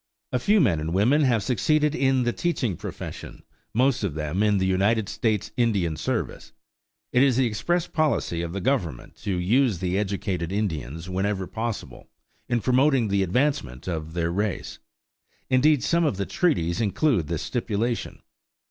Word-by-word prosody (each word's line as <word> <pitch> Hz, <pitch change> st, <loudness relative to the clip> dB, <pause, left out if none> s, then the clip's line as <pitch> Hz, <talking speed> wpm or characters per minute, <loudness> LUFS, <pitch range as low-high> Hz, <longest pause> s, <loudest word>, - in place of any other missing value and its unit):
A 125 Hz, -, +1 dB
few 210 Hz, -, +3 dB
men 100 Hz, -, +3 dB
and 75 Hz, -, -3 dB
many 85 Hz, -, -2 dB
women 125 Hz, +10 st, +4 dB
have 115 Hz, -5 st, +2 dB
succeeded 150 Hz, +7 st, +2 dB
in 135 Hz, -4 st, +2 dB
the 120 Hz, 0 st, 0 dB
teaching 135 Hz, -, -1 dB
profession, 100 Hz, -1 st, -8 dB, 0.3 s
most 125 Hz, 0 st, +2 dB
of 90 Hz, -7 st, -2 dB
them 80 Hz, +5 st, -2 dB
in 105 Hz, -1 st, +3 dB
the 95 Hz, -, +1 dB
United 100 Hz, +3 st, +2 dB
States 110 Hz, -2 st, -1 dB
Indian 100 Hz, -9 st, +1 dB
Service. -, -, -3 dB, 0.6 s
It 125 Hz, -, +5 dB
is 135 Hz, -3 st, +4 dB
the 130 Hz, -, +3 dB
express 140 Hz, +11 st, 0 dB
policy 150 Hz, -, 0 dB
of 85 Hz, -1 st, -4 dB
the 100 Hz, +2 st, -4 dB
Government 90 Hz, -, -2 dB
to 100 Hz, -, -3 dB
use 110 Hz, +5 st, +2 dB
the 90 Hz, +2 st, -1 dB
educated 95 Hz, -4 st, -2 dB
Indians, 85 Hz, -, -3 dB
whenever 95 Hz, +1 st, -1 dB
possible, 115 Hz, +3 st, -5 dB, 0.4 s
in 120 Hz, -1 st, +1 dB
promoting 130 Hz, -2 st, +3 dB
the 100 Hz, 0 st, +2 dB
advancement 95 Hz, -, -1 dB
of 80 Hz, -2 st, -4 dB
their 85 Hz, -1 st, 0 dB
race; 100 Hz, +3 st, -3 dB, 0.7 s
indeed 140 Hz, +2 st, +4 dB
some 170 Hz, 0 st, +2 dB
of 145 Hz, -, 0 dB
the 100 Hz, -, -1 dB
treaties 90 Hz, -, 0 dB
include 110 Hz, -, +1 dB
this 85 Hz, -1 st, -3 dB
stipulation. 115 Hz, -1 st, -2 dB
105 Hz, 165 wpm, -25 LUFS, 90-130 Hz, 0.7 s, It